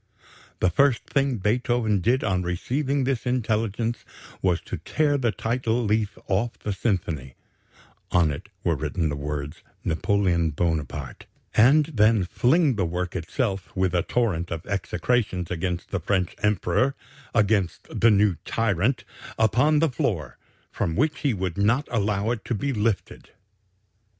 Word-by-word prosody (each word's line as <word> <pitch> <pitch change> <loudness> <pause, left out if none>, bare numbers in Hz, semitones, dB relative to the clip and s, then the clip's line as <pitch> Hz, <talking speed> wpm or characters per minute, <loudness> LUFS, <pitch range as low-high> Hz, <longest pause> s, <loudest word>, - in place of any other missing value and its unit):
The 90 - +3
first 140 +3 +3
thing 135 -3 0
Beethoven 110 0 +1
did 120 +7 +2
on 95 -4 +1
receiving 130 +11 -1
this 130 -2 -1
intelligence 115 -1 -1 0.4
was 90 -2 +2
to - - -5
tear 150 -2 +1
the 120 -5 +1
title 115 +2 -1
leaf 105 -1 0
off 105 +5 0
the 105 - -3
symphony 85 - -2 0.8
(on 85 -4 +3
it 70 - -7
were - - +2
written 80 -3 -1
the 70 - -2
words 75 +2 -5 0.2
'Napoleon 85 0 +1
Bonaparte') 75 -3 -3 0.3
and 140 +7 +6
then 110 -3 +4
fling 135 - +2
the 95 - +1
work 90 +2 -3
itself, 95 - -2
with 95 -1 +1
a 90 - +3
torrent 95 -8 0
of 85 -2 -5
execrations 100 -2 -1
against 90 0 -3
the - - 0
French 95 -3 0
Emperor 105 +5 +1 0.4
against 105 -4 +1
the 115 - +7
new 100 -4 +3
'tyrant' 115 +3 0 0.3
upon 125 +8 +3
the 160 +1 +3
floor, 105 - -2 0.3
from 80 - -2
which 150 +4 +1
he 140 -6 +1
would 95 0 -3
not 115 +8 +2
allow 105 -1 0
it 120 -3 -3
to 120 - -1
be 135 +7 -1
lifted. 105 -2 -2
105 Hz, 145 wpm, -25 LUFS, 90-120 Hz, 0.8 s, the